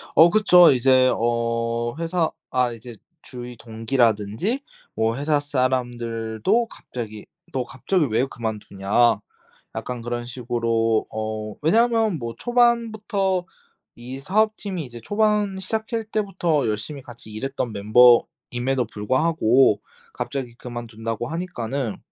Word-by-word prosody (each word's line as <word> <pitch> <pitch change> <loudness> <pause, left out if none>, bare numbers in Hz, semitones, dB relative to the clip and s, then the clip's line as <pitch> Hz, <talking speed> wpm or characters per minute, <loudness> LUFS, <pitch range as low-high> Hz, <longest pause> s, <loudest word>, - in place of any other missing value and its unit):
어 165 +2 +8
그쵸. 180 -4 +7
이제 130 0 +4
어 115 0 -1
회사 165 0 0 0.2
아 125 -1 +2
이제 115 +1 -10 0.3
주위 125 -4 -9
동기라든지 115 - 0 0.3
뭐 110 +1 +1
회사 145 +1 +1
사람들도 125 - 0
갑자기 110 - -8 0.3
"너 130 - 0
갑자기 150 +7 0
왜 115 +4 +2
그만두냐?" 110 -2 0 0.6
약간 125 -1 -4
그런 120 0 -4
식으로 115 -2 0
어 110 -1 -4
왜냐하면 225 +2 +3
뭐 115 -2 -5
초반부터 220 -6 +1 0.5
이 125 +3 -8
사업팀이 200 0 0
이제 120 -1 -10
초반 210 - +1
시작할 220 +3 -3
때부터 190 - 0
열심히 110 +7 -4
같이 120 -4 -12
일했던 125 +1 -3
멤버임에도 120 +3 +3
불구하고 130 +2 +3 0.3
갑자기 135 - -4
그만둔다고 115 -1 -5
하니까는 140 - -3
125 Hz, 265 characters per minute, -23 LUFS, 115-175 Hz, 0.6 s, 어